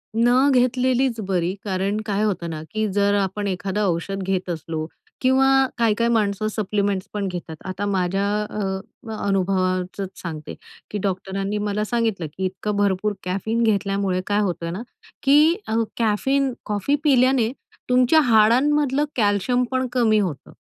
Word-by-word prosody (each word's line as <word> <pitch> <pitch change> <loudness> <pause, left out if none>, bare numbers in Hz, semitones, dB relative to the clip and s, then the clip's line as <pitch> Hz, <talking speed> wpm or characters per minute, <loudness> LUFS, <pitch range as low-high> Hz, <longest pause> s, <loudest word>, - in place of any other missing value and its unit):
न 245 +4 +4
घेतलेलीच 250 -1 +2
बरी 180 -1 0
,कारण 195 +2 -1
काय 205 0 0
होतं 180 -5 -1
ना 155 -1 -5
की 215 0 0
जर 200 0 +2
आपण 200 +1 -1
एखादा 195 +2 -2
औषध 190 +3 -2
घेत 185 -1 -2
असलो 160 -1 -4 0.4
किंवा 260 +1 +4 0.3
काही 230 -2 +3
काही 235 +1 +1
माणसं 215 -1 +1
सप्लिमेंट्सपण 200 -1 -2
घेतात. 175 -3 -6
आता 190 +2 -3
माझ्या 195 0 0 0.2
अ, 210 - -6 0.7
अनुभवाचंच 185 0 0
सांगते 155 -3 -6 0.4
की 210 - -2
डॉक्टरांनी 195 +1 -2
मला 210 0 -1
सांगितलं 225 -8 -1
की 190 - -1
इतकं 200 +3 -3
भरपूर 205 +1 +1
कॅफीन 220 +6 -1
घेतल्यामुळे 195 -3 +1
काय 205 0 +1
होतं 170 -3 -2
ना, 200 - -5 0.4
की 300 +5 +5
अ, 220 - -1 0.2
कॅफीन 260 +4 +1
कॉफी 210 +7 0
पिल्याने 255 -4 +3 0.4
तुमच्या 255 +5 +5
हाडांमधलं 270 +5 +3
कॅल्शियम 220 +3 +2
पण 260 0 0
कमी 220 -4 +3
होतं 170 - -3
205 Hz, 140 wpm, -22 LUFS, 190-235 Hz, 0.7 s, की